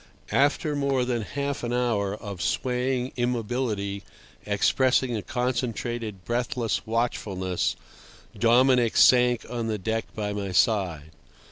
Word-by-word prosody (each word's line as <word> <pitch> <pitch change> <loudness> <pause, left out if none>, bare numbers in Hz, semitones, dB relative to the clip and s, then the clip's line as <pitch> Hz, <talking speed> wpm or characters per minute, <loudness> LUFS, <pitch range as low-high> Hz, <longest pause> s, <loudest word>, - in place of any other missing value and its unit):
After 145 +2 +2
more 140 -3 +1
than 120 -2 -1
half 140 +5 -3
an 120 - -2
hour 115 -5 0
of 100 -5 -7
swaying 125 +4 -1
immobility 115 -4 -1 0.5
expressing 125 +4 +2
a 105 - -2
concentrated, 120 -3 -3
breathless 120 0 -1
watchfulness, 100 -6 -1 0.6
Dominic 120 +2 +4
sank 125 -2 +5
on 120 -2 -3
the 110 -1 -1
deck 110 +3 -2
by 105 -1 -2
my 100 -2 -4
side. 90 -6 +1
120 Hz, 115 wpm, -26 LUFS, 105-125 Hz, 0.6 s, sank